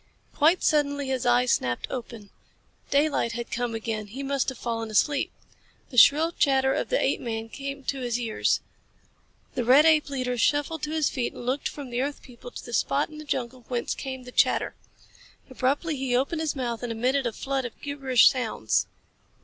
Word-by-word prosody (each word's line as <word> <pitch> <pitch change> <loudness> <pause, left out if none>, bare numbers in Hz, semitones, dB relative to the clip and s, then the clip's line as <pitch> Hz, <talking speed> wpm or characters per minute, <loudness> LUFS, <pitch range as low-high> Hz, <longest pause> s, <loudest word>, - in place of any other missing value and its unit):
Quite 325 +5 +3
suddenly 285 -2 +1
his 260 -2 -1
eyes 245 0 +4
snapped 120 -1 0
open. 230 -5 -7 0.6
Daylight 280 -5 +2
had 235 0 -5
come 240 -1 -2
again. 220 -1 -3
He 260 +7 -7
must 275 -1 0
have 265 - -7
fallen 225 -2 -3
asleep. 280 +6 +1 0.6
The 250 - -7
shrill 310 +6 +6
chatter 265 -4 +2
of - - -2
the - - +2
apeman 225 -1 -1
came 275 +2 -6
to 275 +1 -2
his 240 -1 -1
ears. 225 -3 0 0.9
The 250 - -1
red 265 +6 +6
ape 310 -2 +4
leader 250 -3 -2
shuffled 295 +3 +1
to 300 - -6
his 315 -2 +1
feet 250 -3 -2
and 240 - -9
looked 260 +3 -1
from 280 -4 -8
the 240 +1 0
earth 280 +1 -3
people 245 -1 -11
to - - -9
the 240 - -8
spot 140 - +1
in 305 -1 -10
the - - -7
jungle 255 -3 -3
whence 245 -2 -2
came 260 -1 -6
the 250 - -10
chatter. - - +2 0.8
Abruptly 280 +5 0
he 260 -2 -1
opened 280 +6 0
his 315 -2 -1
mouth 240 -4 -3
and 245 -1 -3
emitted 250 +3 +1
a - - -2
flood 270 +3 -2
of 245 - -7
gibberish 270 -4 +3
sounds. 225 - +1
260 Hz, 190 wpm, -26 LUFS, 240-285 Hz, 0.9 s, shrill